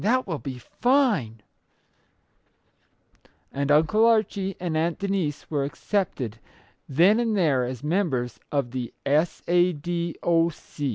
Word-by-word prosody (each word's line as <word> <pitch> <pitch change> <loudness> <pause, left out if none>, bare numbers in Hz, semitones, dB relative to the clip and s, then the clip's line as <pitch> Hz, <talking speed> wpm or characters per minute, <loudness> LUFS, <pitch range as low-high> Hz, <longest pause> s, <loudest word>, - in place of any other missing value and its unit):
That 255 +5 +2
will 165 -6 -3
be 135 -3 -6
fine! 205 - +1 1.4
" - - -36
And 140 +1 -1
Uncle 160 +9 +4
Archie 205 -4 +1
and 175 -3 -2
Aunt 165 +2 0
Denise 195 -7 -2
were 145 -3 0
accepted 140 - -2 0.5
then 175 - +4
and 225 -3 0
there 140 -9 +2
as 125 0 -6
members 150 - -1
of 140 -5 -1
the 125 -2 -5
S. 155 +5 +1
A. 175 +1 +3
D. 170 +2 -3
O. 170 -1 +3
165 Hz, 130 wpm, -25 LUFS, 140-195 Hz, 1.4 s, Uncle